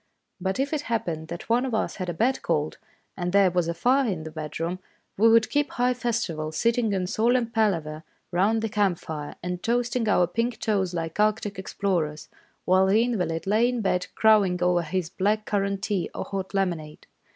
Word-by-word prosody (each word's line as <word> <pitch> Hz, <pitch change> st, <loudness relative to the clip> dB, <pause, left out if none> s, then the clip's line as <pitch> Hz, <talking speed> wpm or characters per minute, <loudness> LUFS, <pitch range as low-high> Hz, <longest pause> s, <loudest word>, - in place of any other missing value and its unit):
But 190 Hz, +5 st, -2 dB
if 280 Hz, +3 st, 0 dB
it 300 Hz, -, 0 dB
hap 230 Hz, -1 st, 0 dB
pened 160 Hz, -2 st, -4 dB
that 170 Hz, -, -7 dB
one 235 Hz, +2 st, +2 dB
of 255 Hz, -4 st, -1 dB
us -, -, -2 dB
had 185 Hz, -3 st, -3 dB
a -, -, -2 dB
bad 245 Hz, +9 st, +1 dB
cold, 155 Hz, -2 st, -1 dB, 0.4 s
and 180 Hz, -1 st, -2 dB
there 195 Hz, -1 st, +5 dB
was 175 Hz, -1 st, +1 dB
a 170 Hz, -, -1 dB
fire 255 Hz, +4 st, +2 dB
in 175 Hz, -5 st, -3 dB
the 160 Hz, -, -7 dB
bedroom, 165 Hz, +3 st, -4 dB, 0.4 s
we 225 Hz, +3 st, +5 dB
would 225 Hz, -1 st, +4 dB
keep 290 Hz, 0 st, +1 dB
high 250 Hz, 0 st, +2 dB
festival, 220 Hz, -11 st, -2 dB
sitting 230 Hz, +6 st, +1 dB
in 190 Hz, -2 st, 0 dB
solemn 235 Hz, +4 st, +1 dB
palaver 165 Hz, -9 st, 0 dB, 0.3 s
round 210 Hz, +5 st, +2 dB
the -, -, +1 dB
camp 200 Hz, -4 st, +1 dB
fire, 150 Hz, -3 st, -6 dB
and 180 Hz, 0 st, -3 dB
toasting 240 Hz, -1 st, 0 dB
our 180 Hz, -3 st, +4 dB
pink 230 Hz, +7 st, -2 dB
toes 190 Hz, -5 st, 0 dB
like 165 Hz, +2 st, -4 dB
Arctic 210 Hz, -2 st, +1 dB
explorers, 175 Hz, -6 st, -2 dB, 0.4 s
while 185 Hz, +1 st, +4 dB
the 215 Hz, +4 st, +4 dB
invalid 180 Hz, -9 st, -1 dB
lay 220 Hz, +5 st, +3 dB
in 245 Hz, -2 st, -2 dB
bed 180 Hz, -3 st, 0 dB
crowing 210 Hz, -5 st, +4 dB
over 180 Hz, -1 st, +3 dB
his 170 Hz, +1 st, -3 dB
black 210 Hz, +3 st, 0 dB
currant 200 Hz, -1 st, -1 dB
tea 200 Hz, -4 st, -1 dB
or -, -, -3 dB
hot 195 Hz, 0 st, -5 dB
lemonade. 170 Hz, -6 st, -2 dB
195 Hz, 195 wpm, -25 LUFS, 175-225 Hz, 0.4 s, there